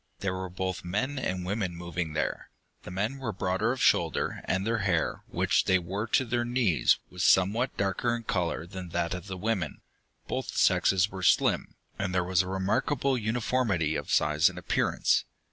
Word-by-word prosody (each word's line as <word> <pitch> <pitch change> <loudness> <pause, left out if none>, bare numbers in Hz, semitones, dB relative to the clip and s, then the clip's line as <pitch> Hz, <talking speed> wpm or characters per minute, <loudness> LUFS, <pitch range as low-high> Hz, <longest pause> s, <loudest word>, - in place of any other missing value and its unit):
There 95 -2 -1
were 95 0 -4
both 95 0 -3
men 130 +11 -2
and 90 -7 -2
women 95 -2 -2
moving 85 -2 -4
there. 75 - -2 0.3
The - - -10
men 105 +9 -2
were 125 -4 -3
broader 95 +3 0
of 130 - -3
shoulder, - - +2
and 95 +1 0
their 115 0 0
hair, 95 -5 0
which - - +1
they 95 - +4
wore 95 +5 -3
to 130 - +2
their 120 0 0
knees, 120 - +2
was 90 -1 -3
somewhat 105 +7 +3
darker 100 +4 0
in 120 - -6
color 85 -5 -1
than 90 0 -8
that 85 0 -1
of 90 +1 -6
the 95 -1 -5
women. 95 -4 -2 0.5
Both - - -4
sexes 95 +1 +3
were 95 0 -6
slim, 90 - +2 0.2
and 95 -2 -2
there 90 - +2
was 90 +1 +2
a 90 - -5
remarkable 100 +9 0
uniformity 110 -8 0
of - - -4
size 75 +3 +3
and 90 - -11
appearance. 90 - +1
95 Hz, 180 wpm, -28 LUFS, 90-115 Hz, 0.5 s, they